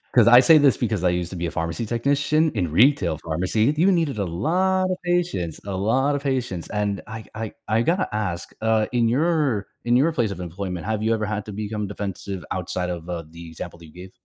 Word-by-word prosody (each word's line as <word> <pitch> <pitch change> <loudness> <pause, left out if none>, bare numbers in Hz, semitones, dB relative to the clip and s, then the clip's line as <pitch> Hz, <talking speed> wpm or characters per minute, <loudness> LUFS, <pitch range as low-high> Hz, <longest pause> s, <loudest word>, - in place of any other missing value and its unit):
'Cause 120 -2 +6
I 120 +1 +9
say 160 +3 +7
this 145 -3 +5
because 110 -6 -1
I 90 - +4
used 90 -1 -1
to 95 - -7
be 85 - -2
a 80 - -3
pharmacy 85 +7 -3
technician 145 +6 +1
in 90 -8 -2
retail 100 - +3
pharmacy, 95 - 0
you 190 +4 +4
needed 160 -9 0
a 100 - -1
lot 185 - +1
of 185 - -1
patience, 175 - -1
a 100 - -4
lot 130 +8 +1
of 140 - -3
patience, 125 -11 -2
and 105 -2 -1
I 110 0 -7
I 110 -1 -5
I 110 +2 +2
gotta 170 - 0
ask, 95 -5 -2
uh, 110 -1 +2
in 120 -2 +2
your 140 - +1 0.2
in 120 +1 +3
your 150 +6 +4
place 120 -8 0
of 90 - -6
employment, 90 +1 -5
have 110 0 -1
you 115 +1 +2
ever 110 -1 -1
had 105 0 -3
to 105 - -7
become 105 0 -3
defensive 100 -1 -5
outside 90 0 -2
of, 85 -1 -5
uh, 85 -2 -4
the 85 +1 -11
example 85 +1 -8
that 85 - -13
you 75 - -16
gave? 90 +1 -10
110 Hz, 230 wpm, -23 LUFS, 90-135 Hz, 0.2 s, I